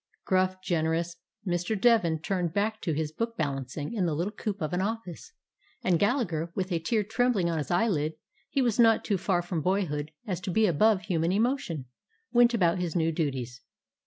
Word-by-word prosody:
Gruff, 185 Hz, 0 st, +2 dB
generous 165 Hz, 0 st, 0 dB, 0.3 s
Mr. 180 Hz, +3 st, -1 dB
Devin 210 Hz, -8 st, +4 dB
turned 175 Hz, -2 st, -2 dB
back 220 Hz, +2 st, 0 dB
to 165 Hz, -, -1 dB
his 150 Hz, 0 st, -2 dB
book 230 Hz, +7 st, -3 dB
balancing 140 Hz, -, -3 dB
in 195 Hz, -6 st, 0 dB
the 155 Hz, -, 0 dB
little 180 Hz, +7 st, -2 dB
coop 210 Hz, -1 st, -4 dB
of 155 Hz, 0 st, -3 dB
an 180 Hz, -, +1 dB
office, 220 Hz, -, -4 dB, 0.5 s
and 175 Hz, -3 st, +2 dB
Gallagher, 180 Hz, -, 0 dB
with 185 Hz, 0 st, -2 dB
a 170 Hz, -, +1 dB
tear 210 Hz, +7 st, 0 dB
trembling 215 Hz, -4 st, +1 dB
on 165 Hz, -, -1 dB
his 145 Hz, -, -4 dB
eyelid, 175 Hz, -5 st, +1 dB, 0.2 s
— -, -, -39 dB
he 275 Hz, -2 st, +1 dB
was 240 Hz, -2 st, 0 dB
not 225 Hz, -2 st, +5 dB
so 205 Hz, -, +1 dB
far 180 Hz, -1 st, +1 dB
from 175 Hz, -2 st, -2 dB
boyhood 155 Hz, -5 st, 0 dB, 0.2 s
as 185 Hz, -5 st, -3 dB
to 185 Hz, -, -4 dB
be 220 Hz, +5 st, +3 dB
above 200 Hz, +3 st, +3 dB
human 175 Hz, -3 st, 0 dB
emotion, 210 Hz, -, 0 dB, 0.2 s
— 450 Hz, 0 st, -43 dB
went 240 Hz, 0 st, +5 dB
about 180 Hz, -4 st, +2 dB
his 175 Hz, -1 st, -2 dB
new 165 Hz, -1 st, +2 dB
duties. 130 Hz, -6 st, -3 dB
180 Hz, 195 wpm, -28 LUFS, 165-215 Hz, 0.5 s, not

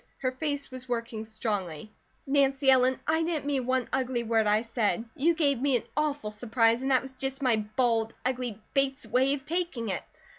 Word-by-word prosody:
Her 255 Hz, -1 st, -1 dB
face 285 Hz, +1 st, -3 dB
was 255 Hz, 0 st, -8 dB
working 230 Hz, -2 st, -3 dB
strongly. 215 Hz, -, -3 dB, 0.3 s
"Nancy 275 Hz, -1 st, +3 dB
Ellen, 255 Hz, 0 st, +4 dB
I 320 Hz, +1 st, +3 dB
didn't 325 Hz, -3 st, -1 dB
mean 270 Hz, -4 st, -1 dB
one 255 Hz, -2 st, +1 dB
ugly 255 Hz, -2 st, 0 dB
word 225 Hz, -1 st, +2 dB
I 210 Hz, +2 st, +3 dB
said. 230 Hz, -1 st, 0 dB
You 330 Hz, +5 st, +2 dB
gave 280 Hz, -6 st, +1 dB
me 275 Hz, -1 st, +2 dB
an -, -, -6 dB
awful 290 Hz, -7 st, -1 dB
surprise, 230 Hz, +2 st, +2 dB
and 265 Hz, -, -1 dB
that 260 Hz, -1 st, +3 dB
was 265 Hz, 0 st, -9 dB
just 270 Hz, +1 st, -4 dB
my 245 Hz, -4 st, +4 dB, 0.2 s
bald, 230 Hz, -3 st, +1 dB
ugly 250 Hz, -4 st, -2 dB
Bates 275 Hz, -1 st, +1 dB
way 265 Hz, +3 st, +2 dB
of 270 Hz, -1 st, -10 dB
taking 325 Hz, -, -2 dB
it. 185 Hz, -, -2 dB
255 Hz, 190 wpm, -28 LUFS, 230-275 Hz, 0.3 s, Ellen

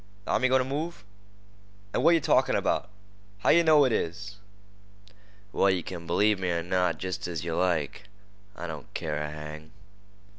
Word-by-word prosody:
"Th'army's 130 Hz, -, +2 dB
goin' 130 Hz, 0 st, +4 dB
t' -, -, -8 dB
move." 155 Hz, +5 st, -4 dB, 0.9 s
"Ah, -, -, +1 dB
what 170 Hz, -, +5 dB
yeh -, -, +3 dB
talkin' -, -, +2 dB
about? -, -, 0 dB, 0.5 s
How -, -, +2 dB
yeh 170 Hz, -, +6 dB
know 155 Hz, -3 st, +5 dB
it 130 Hz, -, +1 dB
is?" 100 Hz, +1 st, -3 dB, 1.2 s
"Well, 100 Hz, -, +3 dB
yeh 90 Hz, -3 st, 0 dB
kin 85 Hz, -1 st, -7 dB
b'lieve 105 Hz, +4 st, +2 dB
me 90 Hz, -1 st, -1 dB
er 85 Hz, -1 st, -1 dB
not, 90 Hz, -2 st, 0 dB
jest 90 Hz, 0 st, -4 dB
as 85 Hz, -3 st, -4 dB
yeh 85 Hz, -, -2 dB
like. 85 Hz, +1 st, -1 dB, 0.5 s
I 85 Hz, -, -6 dB
don't 80 Hz, -6 st, -8 dB
care 75 Hz, -2 st, -2 dB
a 75 Hz, -, -3 dB
hang." 75 Hz, +1 st, -9 dB
90 Hz, 175 wpm, -27 LUFS, 80-115 Hz, 1.2 s, yeh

